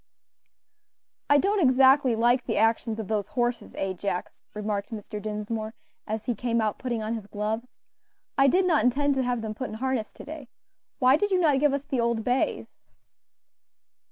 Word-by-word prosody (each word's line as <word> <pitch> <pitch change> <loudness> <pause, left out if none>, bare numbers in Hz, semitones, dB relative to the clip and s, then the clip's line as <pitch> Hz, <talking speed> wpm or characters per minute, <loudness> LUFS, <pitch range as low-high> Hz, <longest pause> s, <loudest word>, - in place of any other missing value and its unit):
"I 285 - +6
don't 395 +6 +2
exactly 265 -2 +5
like 240 +2 +2
the - - -1
actions 225 0 +1
of 215 - -4
those 210 -2 -1
horses, 240 0 -1
Ajax," 190 -1 -3
remarked 210 -1 -3
Mr. 210 -1 -6
Dinsmore, 215 +1 -4 0.3
as 220 0 -3
he 245 - 0
came 235 +1 -1
out 215 -2 -1
putting 240 -4 -2
on 220 +1 -2
his 220 -3 -6
gloves; 215 +4 -3 0.7
"I 275 0 +5
did 365 +7 +3
not 320 -10 +3
intend 280 +4 +2
to 265 - 0
have 245 -2 -1
them 215 -1 -3
put 255 +4 -5
in - - -7
harness 255 -2 -2
to - - -11
day. 300 -4 -9 0.5
Why 255 +2 +5
did 410 +5 0
you 375 -2 +2
not 300 -6 +3
give 295 0 +3
us 280 0 -2
the 265 -4 -2
old 235 -1 0
bays?" 250 +3 0
240 Hz, 180 wpm, -26 LUFS, 215-270 Hz, 0.7 s, I